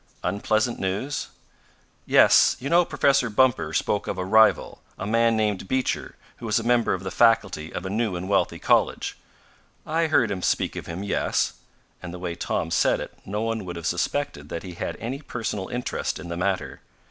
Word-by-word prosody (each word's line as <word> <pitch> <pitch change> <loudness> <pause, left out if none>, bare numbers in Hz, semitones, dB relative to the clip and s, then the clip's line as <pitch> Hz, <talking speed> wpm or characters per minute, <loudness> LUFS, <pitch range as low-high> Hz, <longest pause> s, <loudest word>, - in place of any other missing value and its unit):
"Unpleasant 110 +5 0
news?" 100 +10 -2 0.8
"Yes. - - +6
You 140 +4 -4
know 175 +1 +6
Professor 135 -6 +2
Bumper 115 -8 +2
spoke 100 +5 -1
of - - -3
a 90 - -2
rival 110 +3 +3 0.2
a 95 - -5
man 115 +1 +2
named 105 -3 -1
Beecher 130 +3 -1 0.2
who 115 - -7
is 105 - +3
a 115 - -1
member 120 -2 +2
of 95 - -8
the 95 - -4
faculty 115 -9 +2
of 90 - -5
a - - -3
new 110 -2 0
and 90 +1 -5
wealthy 100 0 +1
college." - - +1 0.7
"I 165 +1 +1
heard 120 -8 +2
him 95 -2 -3
speak - - 0
of - - -6
him 85 +4 -5
yes," 100 - 0 0.5
and 90 - -7
the 90 - -7
way 90 -1 -4
Tom 80 - -2
said - - +2
it - - -7
no 105 +3 -2
one 115 -2 -2
would 90 -1 -6
have 85 -1 -7
suspected 85 - -2
that 85 - -5
he 90 - -8
had 85 - -5
any 130 +5 -4
personal 110 -8 -4
interest 125 0 -3
in 85 - -9
the 85 - -3
matter. 95 +1 -2
105 Hz, 195 wpm, -24 LUFS, 90-120 Hz, 0.8 s, Yes